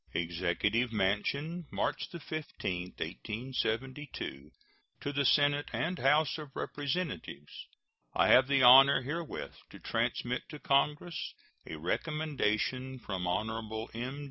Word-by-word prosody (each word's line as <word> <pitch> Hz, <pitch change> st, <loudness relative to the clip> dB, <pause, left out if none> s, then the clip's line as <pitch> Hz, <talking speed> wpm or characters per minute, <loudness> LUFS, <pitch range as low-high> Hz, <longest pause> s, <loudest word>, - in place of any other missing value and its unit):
] -, -, -29 dB
EXECUTIVE 90 Hz, +8 st, 0 dB
MANSION, 140 Hz, -, -1 dB
March -, -, -1 dB
15, 145 Hz, -, -4 dB
1872. 115 Hz, -, -4 dB, 0.5 s
To 145 Hz, -, -4 dB
the 140 Hz, 0 st, +1 dB
Senate 145 Hz, +2 st, +3 dB
and 180 Hz, +2 st, -2 dB
House 150 Hz, +2 st, +3 dB
of 145 Hz, -3 st, -9 dB
Representatives: 140 Hz, -, -4 dB, 0.5 s
I -, -, +4 dB
have 130 Hz, +1 st, +7 dB
the 135 Hz, -2 st, +3 dB
honor 135 Hz, +2 st, +9 dB
herewith 160 Hz, +4 st, -4 dB, 0.2 s
to -, -, -11 dB
transmit 125 Hz, +1 st, -2 dB
to 150 Hz, -, -7 dB
Congress 150 Hz, +4 st, 0 dB, 0.3 s
a -, -, -5 dB
recommendation 130 Hz, -, -1 dB
from 95 Hz, -7 st, -4 dB
Hon. 110 Hz, +3 st, -2 dB
M. 125 Hz, +5 st, -4 dB
130 Hz, 115 wpm, -32 LUFS, 105-145 Hz, 0.5 s, honor